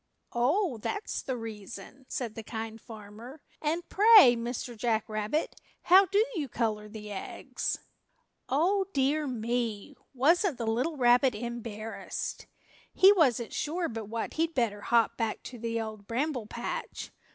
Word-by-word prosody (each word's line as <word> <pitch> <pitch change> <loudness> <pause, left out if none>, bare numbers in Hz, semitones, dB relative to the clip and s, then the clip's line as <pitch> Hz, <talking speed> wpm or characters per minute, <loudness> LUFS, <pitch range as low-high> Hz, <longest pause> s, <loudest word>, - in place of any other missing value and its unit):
"Oh, 265 - +1
that's 415 - -3
the 260 -2 -3
reason?" 225 +4 -9
said 235 -4 -3
the 225 - -6
Kind 225 0 -6
Farmer. 225 +5 -11 0.2
"And 330 +3 -1
pray, 415 - +8
Mr. 235 +1 -4
Jack 220 -1 0
Rabbit, 215 +8 -2 0.2
how 380 +2 +7
do 405 +3 +3
you 300 - -3
color 215 -3 -2
the 210 -1 -8
eggs?" 195 - -4 0.7
Oh, 370 +8 +2
dear 285 +2 +1
me! 235 0 -2 0.2
Wasn't 325 - +3
the 235 - -3
little 250 +8 0
rabbit 245 -1 +4
embarrassed! 225 -1 -5 0.4
He 385 +2 +7
wasn't 255 - +2
sure 335 +3 -1
but 225 -4 -5
what 225 +2 -4
he'd 325 +1 -1
better 220 -5 0
hop 230 0 +2
back 225 -2 -2
to 245 - -9
the 230 0 -2
Old 215 -2 -6
Bramble 250 -1 -2
Patch. 235 +2 -5
240 Hz, 140 wpm, -29 LUFS, 225-300 Hz, 0.7 s, pray